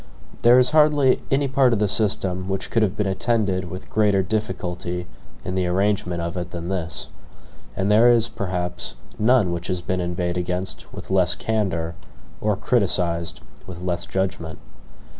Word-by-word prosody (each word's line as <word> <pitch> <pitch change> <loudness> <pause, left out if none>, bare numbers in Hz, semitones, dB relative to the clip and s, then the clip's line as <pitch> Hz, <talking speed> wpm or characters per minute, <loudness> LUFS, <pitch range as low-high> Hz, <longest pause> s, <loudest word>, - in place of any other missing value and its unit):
There 120 +1 +7
is 125 +2 +5
hardly 150 -4 +4
any 140 +1 +2
part 130 -2 +3
of - - +2
the 105 0 +2
system 95 -2 0
which 95 0 -3
could 115 - +2
have 105 -1 +1
been 105 - 0
attended 95 -2 0
with 90 +2 -8
greater 105 -3 +3
difficulty 90 -3 -3 0.4
in 90 - -3
the 95 -1 0
arrangement 90 -2 0
of 85 +1 -4
it 90 -1 -4
than 85 0 -6
this; 90 -4 -2 0.7
and 95 +2 0
there 115 +3 +6
is, 115 -2 +4
perhaps, 90 -4 -4 0.2
none 110 -4 +4
which 85 0 -4
has 90 -1 -2
been 90 +1 -1
inveighed 90 0 -2
against 90 +1 -3
with - - -9
less 90 -2 +3
candor 90 -7 -1 0.5
or 105 -1 +1
criticised 90 - 0 0.3
with 90 -2 -8
less 90 -1 -2
judgment. 90 -4 -2
95 Hz, 160 wpm, -23 LUFS, 90-110 Hz, 0.7 s, There